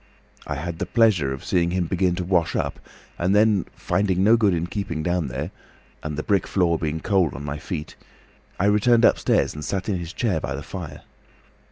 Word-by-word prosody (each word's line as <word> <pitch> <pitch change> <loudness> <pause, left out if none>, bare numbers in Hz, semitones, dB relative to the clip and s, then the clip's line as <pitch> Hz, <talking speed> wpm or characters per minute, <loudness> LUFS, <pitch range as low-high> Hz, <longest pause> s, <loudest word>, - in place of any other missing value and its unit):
I 75 - -2
had 80 +3 -5
the - - -2
pleasure 105 - +3
of 65 - -6
seeing 85 -1 +1
him 90 0 0
begin 90 +1 +1
to 90 - -3
wash 85 -2 +1
up, - - -2 0.4
and 90 +3 +2
then, 105 -3 +3
finding 95 -2 0
no 110 +3 +6
good 110 -4 +3
in 85 -1 0
keeping 85 -4 -4
down 85 -2 0
there, 70 +8 -4 0.5
and 75 -1 -5
the 75 - -2
brick 100 -2 +1
floor 85 -4 +1
being 80 0 -2
cold 95 -6 +1
on 70 +2 -7
my 75 0 -4
feet, 80 -2 -6 0.6
I 95 - +2
returned 115 +3 +4
upstairs - - +2
and 75 - -7
sat 95 +4 -3
in 95 -4 0
his 85 -1 -6
chair 100 -6 0
by - - -4
the - - -6
fire. - - -8
90 Hz, 205 wpm, -23 LUFS, 80-100 Hz, 0.6 s, no